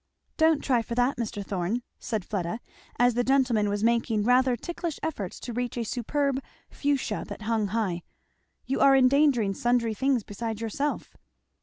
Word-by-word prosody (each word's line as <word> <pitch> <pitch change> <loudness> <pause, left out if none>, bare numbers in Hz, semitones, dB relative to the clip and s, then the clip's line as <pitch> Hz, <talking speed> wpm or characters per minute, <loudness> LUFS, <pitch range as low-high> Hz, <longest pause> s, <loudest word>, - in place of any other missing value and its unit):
"Don't 320 -2 +3
try 250 -4 +2
for 235 +1 -5
that, 250 +3 +2
Mr. 210 -4 -4
Thorn," 195 +6 -2 0.2
said 215 -5 -3
Fleda, 195 +1 -3 0.4
as 245 0 +4
the 245 +1 +1
gentleman 250 -6 +2
was 205 +1 -1
making 230 -2 +2
rather 250 +2 +4
ticklish 340 +4 -5
efforts 220 - -4
to 240 - -5
reach 245 +1 -3
a 235 - 0
superb 270 +4 -1 0.3
Fuchsia 280 -7 -1
that 215 - -8
hung 220 -1 0
high, 195 -5 -1 0.6
"You 270 - -1
are 275 0 +6
endangering 260 -5 +4
sundry 240 +1 +1
things 260 +1 +1
besides 220 +2 -5
yourself." 230 +6 -3
235 Hz, 160 wpm, -27 LUFS, 215-265 Hz, 0.6 s, are